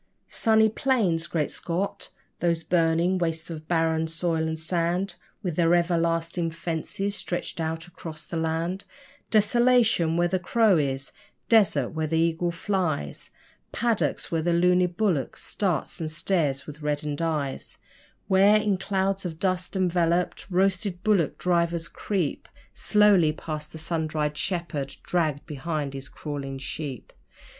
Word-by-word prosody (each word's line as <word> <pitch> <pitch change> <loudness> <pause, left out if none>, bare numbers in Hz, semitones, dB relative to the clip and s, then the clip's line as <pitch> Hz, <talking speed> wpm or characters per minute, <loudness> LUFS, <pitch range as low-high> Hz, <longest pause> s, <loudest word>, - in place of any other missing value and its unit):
'Sunny 220 -1 +4
plains'! 215 - +1
Great 155 -3 -1
Scott! 180 +4 -3 0.3
those 170 -1 +1
burning 170 +2 +2
wastes 165 -1 -2
of 155 -1 -7
barren 160 -1 +1
soil 165 -1 -1
and 160 0 -2
sand 175 +4 -1 0.3
With 175 -5 -3
their 170 0 +4
everlasting 170 0 +1
fences 170 +4 -3
stretching 175 -3 -3
out 160 0 -3
across 160 -3 -9
the - - -7
land! 165 +4 -1 0.5
Desolation 220 -6 +4
where 175 0 +3
the 185 +1 0
crow 210 +1 +3
is! 135 -2 -2 0.4
Desert 180 - +4
where 160 0 -2
the 160 +1 0
eagle 165 +1 +1
flies, 165 - -2 0.4
Paddocks 230 -2 0
where 165 -1 +1
the 170 +2 +1
luny 180 +1 +4
bullock 180 -6 -1
starts 180 -8 -2
and 160 - -2
stares 155 -4 0
with 150 0 -10
reddened 150 0 -2
eyes; 150 -5 -2 0.5
Where, 195 +2 +6
in 210 -3 +1
clouds 195 0 0
of 170 -4 -5
dust 185 +1 -1
enveloped, 175 -1 +1
roasted 185 0 +1
bullock 205 -8 +2
drivers 170 -2 +1
creep 175 +1 -3 0.2
Slowly 205 -7 +4
past 155 -1 -6
the - - -8
sun 160 0 -2
dried 150 -1 -1
shepherd 165 -6 -3
dragged 155 -5 0
behind 150 -1 -3
his 135 -1 -7
crawling 140 -3 -5
sheep. 140 -1 -6
170 Hz, 135 wpm, -26 LUFS, 160-185 Hz, 0.5 s, Where